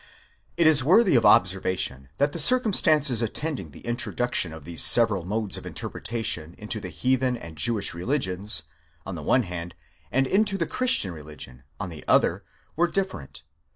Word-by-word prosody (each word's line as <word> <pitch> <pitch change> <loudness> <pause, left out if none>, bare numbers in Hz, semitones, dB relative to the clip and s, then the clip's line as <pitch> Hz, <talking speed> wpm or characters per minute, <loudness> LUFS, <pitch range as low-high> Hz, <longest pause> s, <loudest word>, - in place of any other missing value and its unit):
It 170 - +3
is 155 -4 +8
worthy 185 - +4
of 115 - +4
observation 90 -8 +1
that 145 +1 +1
the 170 - -5
circumstances 155 - +3
attending 120 - -4
the 70 - -15
introduc 125 +1 -3
tion 85 - 0
of 80 -2 -11
these 85 -1 0
several 105 -7 +4
modes 105 +1 -2
of - - -10
interpretation 110 -8 -3
into 105 +1 -4
the 95 -3 -7
heathen 125 +9 0
and 85 -7 -11
Jewish 110 +3 +1
religions, 95 - -1 0.4
on 95 - -6
the 80 - -7
one 125 - +2
hand, 90 -2 -7 0.4
and 135 +2 +2
into 200 +5 +1
the 170 - -1
christian 240 - 0
religion, 75 -5 -11
on 100 -3 -4
the 80 -3 -10
other, - - +2 0.3
were 175 +2 +2
different. 185 - -5
110 Hz, 165 wpm, -25 LUFS, 85-145 Hz, 0.4 s, is